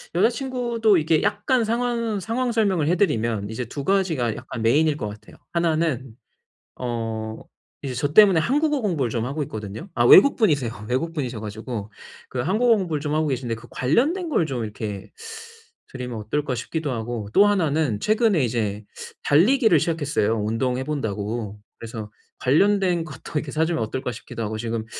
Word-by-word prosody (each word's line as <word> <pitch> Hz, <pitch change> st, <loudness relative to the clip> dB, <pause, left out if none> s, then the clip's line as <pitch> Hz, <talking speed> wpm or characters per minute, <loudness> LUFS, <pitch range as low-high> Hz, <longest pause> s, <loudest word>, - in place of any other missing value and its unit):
여자 190 Hz, +5 st, +5 dB
친구도 240 Hz, -4 st, +1 dB
이게 155 Hz, -1 st, +2 dB
약간 210 Hz, +5 st, +1 dB
상황 230 Hz, -1 st, -1 dB
상황 240 Hz, +5 st, -1 dB
설명을 200 Hz, -9 st, +1 dB
해 175 Hz, -, +3 dB
드리면 115 Hz, -, 0 dB
이제 120 Hz, +3 st, -4 dB
2 140 Hz, +5 st, -6 dB
가지가 160 Hz, -, +1 dB
약간 120 Hz, -2 st, -7 dB
메인일 145 Hz, +6 st, +3 dB
거 105 Hz, -, -3 dB
같아요. 105 Hz, +1 st, -11 dB, 0.2 s
1 170 Hz, -2 st, +2 dB
는 135 Hz, -7 st, -2 dB, 0.7 s
어 110 Hz, -2 st, -3 dB, 0.4 s
이제 135 Hz, -3 st, -4 dB
저 145 Hz, +4 st, -2 dB
때문에 195 Hz, -4 st, +7 dB
한국어 295 Hz, -, +1 dB
공부를 165 Hz, -, 0 dB
좀 115 Hz, 0 st, -1 dB
하고 145 Hz, +4 st, -2 dB
있거든요. 110 Hz, -, -7 dB
아 120 Hz, -, +2 dB
외국분이세요. 145 Hz, -, +5 dB
외국분이셔 130 Hz, -4 st, -2 dB
가지고 110 Hz, 0 st, -6 dB, 0.4 s
그 130 Hz, -, -4 dB
한국어 215 Hz, -, +3 dB
공부를 165 Hz, -7 st, -2 dB
좀 145 Hz, 0 st, -2 dB
하고 155 Hz, 0 st, +1 dB
계신데 125 Hz, -4 st, -2 dB
그 115 Hz, +2 st, -13 dB
관련된 295 Hz, -, +1 dB
걸 220 Hz, -, +2 dB
좀 130 Hz, -6 st, -3 dB
이렇게 105 Hz, -2 st, -6 dB, 0.8 s
드리면 125 Hz, -3 st, -5 dB
어떨까 125 Hz, +5 st, -2 dB
싶기도 145 Hz, +5 st, -3 dB
하고 115 Hz, -2 st, -4 dB
또 205 Hz, -, +7 dB
1 195 Hz, -6 st, +2 dB
는 140 Hz, -8 st, 0 dB
최근에 215 Hz, -, +2 dB
이제 110 Hz, -3 st, -2 dB, 0.4 s
달리기를 205 Hz, -, +4 dB
시작했어요, 145 Hz, -9 st, 0 dB
운동해 125 Hz, +4 st, -1 dB
본다고. 110 Hz, -6 st, -3 dB, 0.2 s
그래서 110 Hz, -2 st, -7 dB, 0.3 s
'관련된 180 Hz, +4 st, +3 dB
것도 150 Hz, -4 st, -10 dB
이렇게 150 Hz, -1 st, -1 dB
사 160 Hz, +3 st, +1 dB
주면 160 Hz, -8 st, -1 dB
어떨까?' 125 Hz, +4 st, -3 dB
싶기도 115 Hz, -, -8 dB
하고. 110 Hz, 0 st, -3 dB
지금 115 Hz, 0 st, -3 dB
145 Hz, 360 characters per minute, -23 LUFS, 115-195 Hz, 0.8 s, 때문에